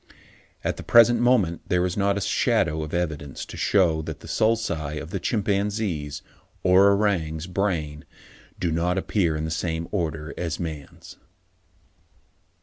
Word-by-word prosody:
At -, -, -1 dB
the -, -, -7 dB
present 120 Hz, 0 st, +6 dB
moment 115 Hz, -9 st, +2 dB
there 90 Hz, 0 st, +2 dB
is 90 Hz, 0 st, -2 dB
not 100 Hz, 0 st, +1 dB
a -, -, -2 dB
shadow 80 Hz, -4 st, +1 dB
of 75 Hz, 0 st, -5 dB
evidence 80 Hz, -6 st, -3 dB
to -, -, -10 dB
shew 85 Hz, -6 st, +2 dB
that 80 Hz, -2 st, -6 dB
the -, -, -11 dB
sulci 85 Hz, -10 st, 0 dB
of 80 Hz, +3 st, -9 dB
a 95 Hz, -, -1 dB
chimpanzee's, 100 Hz, -, -1 dB, 0.4 s
or 95 Hz, +2 st, +6 dB
orang's, 90 Hz, -6 st, 0 dB
brain 85 Hz, -6 st, -2 dB, 0.5 s
do 85 Hz, -, 0 dB
not 85 Hz, +3 st, 0 dB
appear 95 Hz, -4 st, 0 dB
in 75 Hz, +1 st, -2 dB
the 80 Hz, -, -4 dB
same 80 Hz, +1 st, -2 dB
order 80 Hz, -5 st, -3 dB
as 85 Hz, -4 st, -3 dB
a -, -, -4 dB
man's. 75 Hz, -4 st, -8 dB
85 Hz, 150 wpm, -24 LUFS, 80-100 Hz, 0.5 s, present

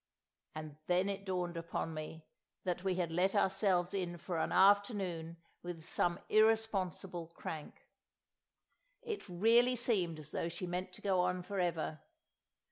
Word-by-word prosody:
And 155 Hz, -1 st, -7 dB
then 180 Hz, +2 st, +3 dB
it 200 Hz, 0 st, -4 dB
dawned 180 Hz, -2 st, -2 dB
upon 165 Hz, -1 st, -3 dB
me 155 Hz, +1 st, -7 dB, 0.4 s
that 180 Hz, -1 st, -2 dB
we 190 Hz, -2 st, +1 dB
had 175 Hz, -2 st, -1 dB
let 180 Hz, +4 st, +2 dB
ourselves 190 Hz, -2 st, +2 dB
in 180 Hz, -3 st, -2 dB
for 170 Hz, 0 st, -3 dB
an -, -, 0 dB
afternoon 190 Hz, -5 st, +3 dB, 0.2 s
with 175 Hz, -2 st, -6 dB
some 175 Hz, 0 st, +1 dB
irresponsible 200 Hz, -5 st, +2 dB
crank. 155 Hz, -2 st, -7 dB, 1.2 s
It 435 Hz, -, -5 dB
really 230 Hz, +7 st, +4 dB
seemed 195 Hz, -9 st, +1 dB
as 155 Hz, -2 st, -8 dB
though 165 Hz, -, -1 dB
she 170 Hz, +2 st, -5 dB
meant 180 Hz, +1 st, -3 dB
to -, -, -12 dB
go 190 Hz, -2 st, +2 dB
on 180 Hz, 0 st, +1 dB
for 195 Hz, +2 st, -3 dB
ever. 165 Hz, -3 st, -1 dB
180 Hz, 145 wpm, -35 LUFS, 170-195 Hz, 1.2 s, really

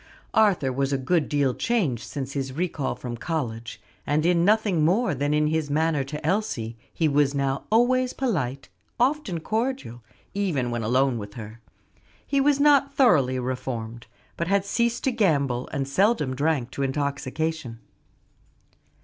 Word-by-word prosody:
Arthur 195 Hz, -12 st, +3 dB
was 135 Hz, +1 st, 0 dB
a 140 Hz, -, +1 dB
good 150 Hz, +4 st, 0 dB
deal 140 Hz, -3 st, +1 dB
changed 170 Hz, -, 0 dB
since 135 Hz, -2 st, -5 dB
his 135 Hz, -2 st, -3 dB
recall 160 Hz, -3 st, -2 dB
from 120 Hz, -2 st, -6 dB
college; 115 Hz, -6 st, -4 dB, 0.3 s
and 150 Hz, +2 st, +1 dB
in 170 Hz, -1 st, +3 dB
nothing 205 Hz, -4 st, +3 dB
more 190 Hz, +5 st, +2 dB
than 145 Hz, +2 st, -1 dB
in 150 Hz, 0 st, +2 dB
his 155 Hz, -1 st, 0 dB
manner 155 Hz, -1 st, +1 dB
to 150 Hz, +3 st, -7 dB
Elsie; 155 Hz, -, -1 dB, 0.2 s
he 160 Hz, -, +1 dB
was 145 Hz, -1 st, +2 dB
now 135 Hz, -1 st, -1 dB
always 250 Hz, +3 st, +3 dB
polite; 140 Hz, -, -2 dB, 0.3 s
often 250 Hz, -, +1 dB
cordial 220 Hz, -, -3 dB, 0.3 s
even 165 Hz, -12 st, -1 dB
when 120 Hz, -1 st, -2 dB
alone 125 Hz, +2 st, +1 dB
with 100 Hz, -1 st, -9 dB
her. 110 Hz, 0 st, -9 dB, 0.7 s
He 275 Hz, -1 st, +1 dB
was 285 Hz, 0 st, +3 dB
not 280 Hz, -1 st, +4 dB
thoroughly 140 Hz, -, +4 dB
reformed, 120 Hz, -3 st, -4 dB, 0.3 s
but 170 Hz, -, -2 dB
had 200 Hz, +1 st, +2 dB
ceased 235 Hz, +3 st, 0 dB
to 265 Hz, -, +2 dB
gamble 140 Hz, -, +1 dB
and 135 Hz, -2 st, -2 dB
seldom 150 Hz, -, +1 dB
drank 140 Hz, -3 st, 0 dB
to 140 Hz, -, -5 dB
intoxication. 140 Hz, -1 st, -2 dB
150 Hz, 150 wpm, -25 LUFS, 130-200 Hz, 0.7 s, not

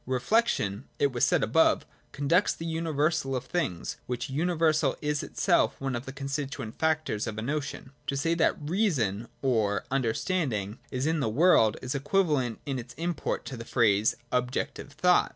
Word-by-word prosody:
Reflection, 130 Hz, -, +1 dB
it 140 Hz, -1 st, +2 dB
was 120 Hz, -1 st, -1 dB
said -, -, +3 dB
above, -, -, +3 dB, 0.3 s
conducts 160 Hz, +8 st, +2 dB
to -, -, -15 dB
the 165 Hz, -, -6 dB
universal 155 Hz, -4 st, 0 dB
of 125 Hz, -, -3 dB
things: 140 Hz, -, -2 dB
which 125 Hz, +1 st, -3 dB
uni 170 Hz, +6 st, 0 dB
versal 155 Hz, -4 st, +2 dB
is 150 Hz, 0 st, -1 dB
itself -, -, +1 dB
one 135 Hz, -2 st, -2 dB
of 120 Hz, +3 st, -5 dB
the -, -, -4 dB
constituent 135 Hz, -4 st, -4 dB
factors 155 Hz, -9 st, 0 dB
of 110 Hz, -1 st, -4 dB
a -, -, -2 dB
notion. 140 Hz, -1 st, -3 dB, 0.2 s
To 140 Hz, -, -1 dB
say 165 Hz, +4 st, +1 dB
that 165 Hz, -1 st, +2 dB
Reason 145 Hz, -, 0 dB, 0.2 s
or 110 Hz, -6 st, +1 dB
Understanding 125 Hz, -, -1 dB
is 130 Hz, +1 st, -2 dB
in 160 Hz, 0 st, +1 dB
the 125 Hz, -, 0 dB
world, 115 Hz, -4 st, +4 dB
is 130 Hz, -, -2 dB
equivalent 145 Hz, -, +1 dB
in 135 Hz, -2 st, -2 dB
its 120 Hz, 0 st, -9 dB
import 170 Hz, +2 st, -2 dB
to 135 Hz, -, -6 dB
the 115 Hz, -, -6 dB
phrase 110 Hz, -3 st, +3 dB
' 120 Hz, -, -37 dB
Objective 125 Hz, +3 st, -4 dB
Thought.' 180 Hz, +5 st, +3 dB
135 Hz, 175 wpm, -28 LUFS, 120-160 Hz, 0.3 s, world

